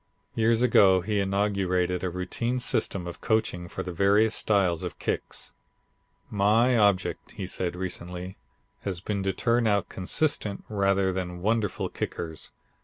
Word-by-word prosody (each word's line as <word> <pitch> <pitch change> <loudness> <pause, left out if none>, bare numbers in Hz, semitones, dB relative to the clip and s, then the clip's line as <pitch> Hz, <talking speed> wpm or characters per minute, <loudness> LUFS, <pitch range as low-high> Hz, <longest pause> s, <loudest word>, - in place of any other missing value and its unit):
Years 115 +1 +2
ago 95 -6 +5
he 105 +3 -1
inaugurated 95 -2 0
a 90 - 0
routine 90 +8 -2
system 100 -6 0
of 85 0 -8
coaching 110 -6 0
for - - -5
the 90 - -5
various 100 +5 +3
styles 95 -6 +1
of - - -5
kicks. - - -4 0.8
"My 110 +5 +3
object," 100 -4 +1
he - - -5
said 90 -1 -3
recently, 90 0 -5 0.4
"has 95 -3 -4
been 100 +2 -3
to 95 0 0
turn 115 +4 +1
out 100 -2 +1
consistent 105 +1 -1
rather 100 -2 +2
than 90 -1 -4
wonderful 110 -2 0
kickers. 80 -2 -5
100 Hz, 140 wpm, -27 LUFS, 90-110 Hz, 0.8 s, ago